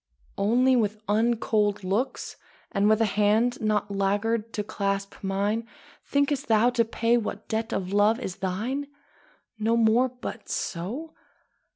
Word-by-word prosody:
Only 250 +6 +4
with 215 -3 0
uncold 210 -1 +1
looks, 200 +8 -2 0.4
And 200 +1 +2
with 215 +1 +3
a - - +5
hand 215 +4 +2
not 210 -1 0
laggard 205 +3 0
to 210 - -2
clasp 200 -1 -2
mine, 205 +4 -1 0.4
Think'st 280 -1 +1
thou 225 +2 +4
to 240 -1 +2
pay 230 +1 +1
what 230 - -4
debt 225 +1 -2
of 185 0 -2
love 210 +3 +4
is 190 - -5
thine? 220 +10 -2 0.7
No 225 +2 +2
more 230 +3 +4
but 250 0 -8
so? 240 - -4
220 Hz, 140 wpm, -26 LUFS, 205-235 Hz, 0.7 s, a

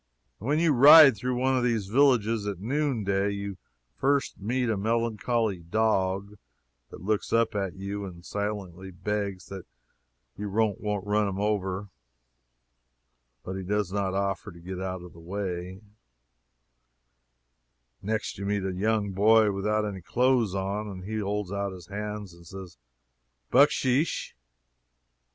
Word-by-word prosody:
When 140 +8 0
you 165 -2 +3
ride 140 +1 +9
through 125 +5 -2
one 130 +2 +1
of 125 - +1
these 115 -4 +1
villages 115 -2 +2
at 100 -3 -3
noon 135 +1 -1
day, 100 0 +1
you 100 -1 -4 0.4
first 140 +1 0
meet 120 +5 -1
a 110 - +1
melancholy 115 -1 0
dog, 100 +1 0 0.5
that - - -11
looks 105 +1 -1
up 115 0 +2
at 95 -3 -2
you 100 +1 -5
and 85 -2 -10
silently 100 -3 -4
begs 100 0 -3
that 95 -2 -8 0.7
you 105 0 -5
won't 105 -1 0 0.2
run 105 -2 0
over 100 -2 0
him, 100 - -13 1.5
but 95 - -5
he 95 - -4
does 100 0 -1
not 100 -2 -1
offer 100 +1 -2
to 85 - -14
get 90 +2 -6
out 95 -1 -4
of 90 - -12
the 85 - -14
way; 90 +1 -5 2.2
next 110 -1 -3
you 100 - -4
meet 100 -1 -1
a 95 - -2
young 105 +1 0
boy 105 +2 +5
without 105 +2 0
any 100 -3 -5
clothes 115 +3 +2
on, 100 +2 -2
and 95 -2 -7
he 110 +3 -3
holds 105 -2 -2
out 100 -1 -2
his 90 -2 -11
hand 105 0 -5
and 85 0 -16
says 95 -4 -10 0.7
"Bucksheesh!" 140 +1 +3
100 Hz, 145 wpm, -27 LUFS, 95-110 Hz, 2.2 s, ride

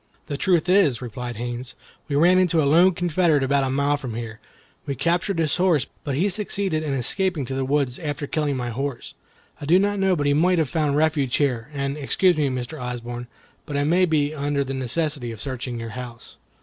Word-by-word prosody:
"The 145 - -4
truth 175 +1 +2
is," 180 - +4
replied 120 0 -6
Haines, 120 +3 -5 0.3
"we 145 - -2
ran 175 +5 +5
into 175 -3 +2
a 150 - +3
lone 170 +5 +5
Confederate 170 -4 +2
about 140 +1 +2
a 135 - 0
mile 140 +2 +1
from 130 -6 -6
here. 115 -1 -6 0.5
We 140 - -2
captured 175 +5 0
his 160 -3 +1
horse, 175 -6 +3 0.2
but 140 -3 -2
he 175 +8 +2
succeeded 195 -4 -1
in 145 -3 -2
escaping 160 +4 0
to 135 - -5
the 135 0 -1
woods, 135 -2 0
after 145 -3 -3
killing 145 -2 -1
my 120 -1 -3
horse. 135 +2 -4 0.5
I - - -5
did 180 +5 +5
not 205 0 0
know 190 -1 +3
but 145 -3 -1
he 145 - +3
might 175 +5 +3
have 160 -5 +1
found 150 -2 0
refuge 150 -5 +1
here; 130 -4 0
and, 140 0 -3
excuse 175 +5 +2
me, 150 -3 +1
Mr. 130 +3 -5
Osborne, 120 0 -5 0.4
but 145 -2 -3
I 145 - +1
may 175 +5 +3
be 155 -3 +1
under 145 -1 -1
the 135 0 -5
necessity 130 -1 -1
of 110 - -9
searching 125 -1 -4
your 115 0 -5
house." 120 0 -9
145 Hz, 215 wpm, -23 LUFS, 130-165 Hz, 0.5 s, ran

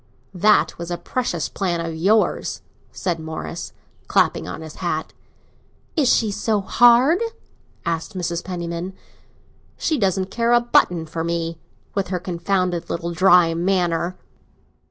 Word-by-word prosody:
"That 205 +1 +3
was 170 0 -5
a 175 - -2
precious 180 -10 -2
plan 175 -3 -2
of 165 -1 -3
yours!" 205 +7 +1 0.3
said 175 -3 -2
Morris, 160 +1 -6 0.4
clapping - - +2
on - - -6
his 160 -1 -9
hat. 160 -3 -3 0.8
"Is 290 -7 +3
she 220 -3 +2
so 215 +1 0
hard?" 240 - +5 0.7
asked 170 +4 -3
Mrs. 170 -1 -2
Penniman. 175 0 -4 0.8
"She 310 -4 0
doesn't 190 -2 0
care 235 0 +1
a 240 - +7
button 180 -8 +2
for 165 +1 -4
me—with 170 +3 -4
her 180 0 -2
confounded 180 0 -1
little 170 0 -3
dry 180 -1 +5
manner." 175 0 0
180 Hz, 130 wpm, -22 LUFS, 170-200 Hz, 0.8 s, a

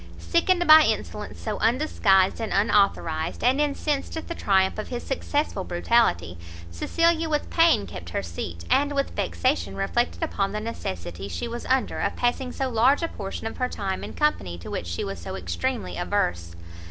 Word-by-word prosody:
Sickened 350 +1 +1
by 310 0 +10
insolence - - -2
so 215 -2 -4
undisguised 225 -6 +3
and 225 - -3
unauthorised, 195 -5 +1
and 260 +4 +3
incensed 295 +1 -1
at 320 - -6
the 340 - -3
triumph 190 - +2
of 215 - -4
his 245 -1 -5
successful 280 -6 -1
brutality, 130 - +1 0.3
Cecilia 330 - +1
with 300 -1 -1
pain 330 -11 +4
kept 85 -2 -8
her 90 - -2
seat, 85 0 -6
and 290 +1 +3
with 275 0 0
vexation 260 +4 0
reflected 240 +10 -1
upon 200 -10 -1
the 210 - -2
necessity 95 - -5
she 240 - -4
was 235 +1 -6
under 260 0 +1
of - - -1
passing 250 +1 0
so 270 - -2
large 255 +6 +3
a - - +1
portion 195 +1 -6
of 225 - -4
her 250 0 0
time 195 -2 -3
in - - -7
company 195 - 0
to 85 - -9
which 85 - -4
she 85 0 -3
was 100 -2 -5
so 85 - -6
extremely 90 0 -3
averse. 85 -1 -1
220 Hz, 175 wpm, -25 LUFS, -, 0.3 s, by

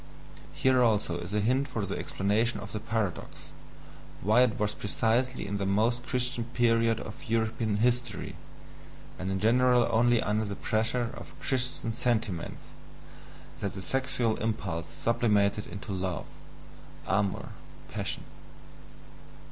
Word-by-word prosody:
Here 130 -1 +3
also 105 -7 +2
is 90 +2 -6
a 105 - +1
hint 130 +6 +2
for 115 -6 -3
the - - -3
explanation 105 +3 0
of 105 +1 -8
the 110 - -3
paradox, 110 -4 -3 0.7
why 110 +6 +5
it 125 -4 +3
was 105 0 +1
precisely 115 +4 0
in 100 0 -3
the 100 - -1
most 110 +5 +2
Christian 125 -2 0
period 115 -2 +2
of 110 - -8
European 110 -1 0
history, 120 -1 0 0.8
and 95 - -3
in 95 0 -1
general 125 +3 +4
only 120 +1 +4
under 105 +1 0
the 100 -1 -4
pressure 115 +3 0
of - - -11
Christian 125 -3 +2
sentiments, 115 -6 -1 0.9
that 100 - -3
the 95 - -6
sexual 130 -3 0
impulse 95 -7 -2
sublimated 105 +1 +1
into 100 0 -7
love 95 -2 -2 0.8
(amour 100 0 0 0.4
passion). - - -3
110 Hz, 130 wpm, -29 LUFS, 100-120 Hz, 0.9 s, why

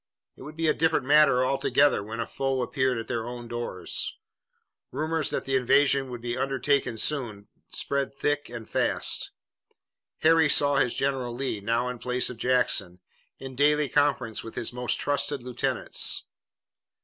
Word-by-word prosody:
It - - -16
would 150 +4 -10
be 165 0 0
a - - +4
different 160 -4 +1
matter 145 -3 +5
altogether 135 -2 +2
when 110 +3 -7
a - - -1
foe 135 -1 -2
appeared 130 -1 0
at 115 - -5
their 115 -2 -3
own 120 -1 -7
doors. 120 -7 -3 0.7
Rumors 155 +2 -1
that - - -3
the 135 - 0
invasion 135 +1 +3
would 120 -2 -7
be 120 0 -3
undertaken 135 -2 0
soon 110 -7 -1 0.2
spread 140 -1 -2
thick 145 +1 -2
and 115 -2 -8
fast. - - 0 0.9
Harry 160 -1 +5
saw 145 -1 +4
his 125 -3 +1
general, 130 -3 -1
Lee 130 -4 -2
now 115 +4 0
in 125 -1 -5
place 125 +1 0
of 125 - -10
Jackson, 110 -7 0 0.4
in 135 -1 -9
daily 150 +2 +3
conference 130 -6 +1
with 115 - -9
his 120 0 -2
most 125 0 -1
trusted 145 -2 -1
lieutenants. 125 -1 -1
130 Hz, 160 wpm, -26 LUFS, 120-145 Hz, 0.9 s, matter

